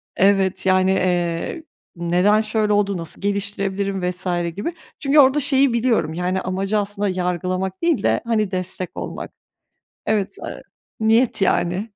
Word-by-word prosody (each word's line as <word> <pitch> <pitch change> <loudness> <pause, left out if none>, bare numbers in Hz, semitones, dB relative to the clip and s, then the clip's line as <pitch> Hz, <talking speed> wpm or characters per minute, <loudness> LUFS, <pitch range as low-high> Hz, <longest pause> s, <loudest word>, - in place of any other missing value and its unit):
Evet, 190 -1 +2
yani, 185 0 +3
eee, 180 - -1 0.3
neden 180 +5 +2
şöyle 215 -1 0
oldu, 200 -2 +1
nasıl 165 +1 -6
geliştirebilirim 200 -1 -2
vs. 180 +1 -6 0.3
gibi. 225 - -3 0.3
Çünkü 285 +1 +3
orada 275 +1 +6
şeyi 270 -2 +3
biliyorum, 230 -9 +1
yani, 180 +2 -1
amacı 195 +3 -1
aslında 205 0 -1
yargılamak 185 - -2
değil 335 -2 +1
de, - - +2
hani, 215 -4 0
destek 185 -1 -4
olmak. - - -6 0.8
Evet, 200 -2 0
eee, - - -7 0.4
niyet 225 +1 +3
yani. 190 +3 0
195 Hz, 135 wpm, -21 LUFS, 185-215 Hz, 0.8 s, orada